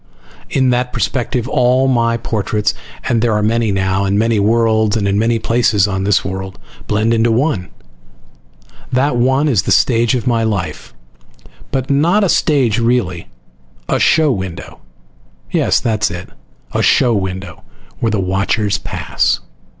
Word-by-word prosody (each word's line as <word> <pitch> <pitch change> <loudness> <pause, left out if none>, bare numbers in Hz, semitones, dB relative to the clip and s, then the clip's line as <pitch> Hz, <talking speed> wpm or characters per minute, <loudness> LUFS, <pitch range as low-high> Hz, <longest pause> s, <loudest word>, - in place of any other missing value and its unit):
In 130 -2 +2
that 125 0 0
perspective 125 -1 -2
all 130 0 +2
my 115 -2 +1
portraits 105 -2 -1 0.3
(and 115 -2 +1
there 115 -1 +1
are 105 0 0
many 115 0 +1
now, 95 0 0
on 100 +1 0
many 115 0 +1
worlds 110 0 +2
and 100 -2 -1
in 100 +1 +1
many 115 +1 +1
places 110 -3 +1
on 95 -1 -2
this 100 -1 +2
world!) 95 0 -5 0.3
blend 110 +2 +1
into 115 0 +2
one. 115 - 0 1.2
That 130 +1 +1
one 130 +5 +2
is 120 -10 +2
the - - -3
stage 120 0 +3
of 125 - -3
my 120 -2 +1
life. 105 - -3 0.7
But 135 0 -2
not 170 +9 +3
a 195 - +1
stage, 130 -10 +2
really. 115 -8 0 0.6
A - - 0
show 155 -2 +3
window. 95 -6 -6 0.7
Yes, - - +2
that 110 -3 -1
is - - +1
it. 90 0 -7 0.4
A - - -1
show 120 - +3
window, 95 -2 -4 0.4
where 115 - 0
the 110 -2 -1
watchers 100 +2 0
pass. - - -1
115 Hz, 155 wpm, -16 LUFS, 100-125 Hz, 1.2 s, stage